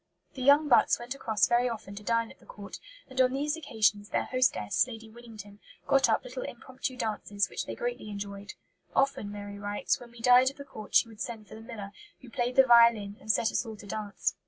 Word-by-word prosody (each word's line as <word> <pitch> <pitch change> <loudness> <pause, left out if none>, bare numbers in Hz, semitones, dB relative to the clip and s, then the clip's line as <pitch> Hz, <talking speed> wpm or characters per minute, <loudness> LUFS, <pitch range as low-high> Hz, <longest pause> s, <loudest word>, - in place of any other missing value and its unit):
The 265 - -8
young 285 +3 +5
Butts 255 - +5
went 240 +2 -6
across 220 -8 +1
very 240 +1 +2
often 215 -4 -7
to 200 - -8
dine 230 +2 0
at - - -18
the - - -20
Court; - - -9 0.3
and 260 -1 0
on 255 0 +3
these 295 +3 -1
occasions 210 - 0
their - - 0
hostess, 255 - +1
Lady 225 -2 -10
Winnington, 215 -3 -12 0.3
got 270 -1 +4
up - - +2
little - - -7
impromptu 260 - -6
dances, 205 -4 -2
which - - -4
they - - -5
greatly 240 -3 -4
enjoyed. 200 0 -7 0.4
"Often," 270 -7 +1
Mary 205 0 -8
writes, 205 0 -1
"when 245 - -12
we 235 0 -16
dined 250 +2 +6
at 275 - -14
the 280 - -9
Court 215 -6 -9
she - - +6
would 220 -2 -12
send 220 -3 -6
for - - -13
the 220 - -10
miller, 210 -3 -8 0.3
who 250 - -14
played 245 -1 -1
the 265 - +8
violin, 235 -4 +5
and 215 - +1
set 225 0 +1
us - - 0
all 225 -2 -8
to 205 - -13
dance. 200 -4 -3
230 Hz, 225 wpm, -29 LUFS, 205-255 Hz, 0.4 s, the